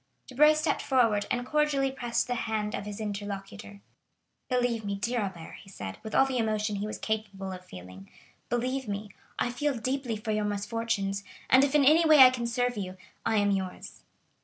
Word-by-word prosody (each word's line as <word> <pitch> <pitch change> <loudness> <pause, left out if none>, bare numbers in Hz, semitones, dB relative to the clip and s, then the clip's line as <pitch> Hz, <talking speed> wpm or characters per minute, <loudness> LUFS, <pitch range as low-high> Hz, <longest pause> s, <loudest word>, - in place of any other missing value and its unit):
Debray 300 +4 +5
stepped 305 -1 0
forward, 230 -6 +2
and 245 0 -1
cordially 285 -2 +1
pressed 240 -3 -1
the 245 - -2
hand 220 -3 -2
of 200 - -4
his 205 0 -6
interlocutor. 205 -1 -6 0.7
"Believe 245 -3 0
me, 200 -1 -2
dear 235 +5 -1
Albert," 190 -6 -5
he - - -15
said, 95 - -7
with 220 - -6
all 270 - +6
the 260 -2 -1
emotion 215 -2 0
he 205 +1 -3
was 215 - -5
capable 205 -3 -3
of 185 -1 -8
feeling,—"believe 125 - -6
me, 205 0 -4 0.3
I 240 - 0
feel 280 +2 -1
deeply 255 0 -2
for 215 +1 -4
your 210 0 0
misfortunes, 205 -1 -2 0.3
and 260 +2 +7
if 280 +1 +1
in 285 -2 +5
any 315 +4 +6
way 310 -2 +6
I 260 -2 +10
can 240 -2 -3
serve 245 0 -1
you, 185 -2 -5 0.3
I 225 - +2
am 205 -1 +3
yours." 190 -2 -4
220 Hz, 185 wpm, -28 LUFS, 200-255 Hz, 0.7 s, I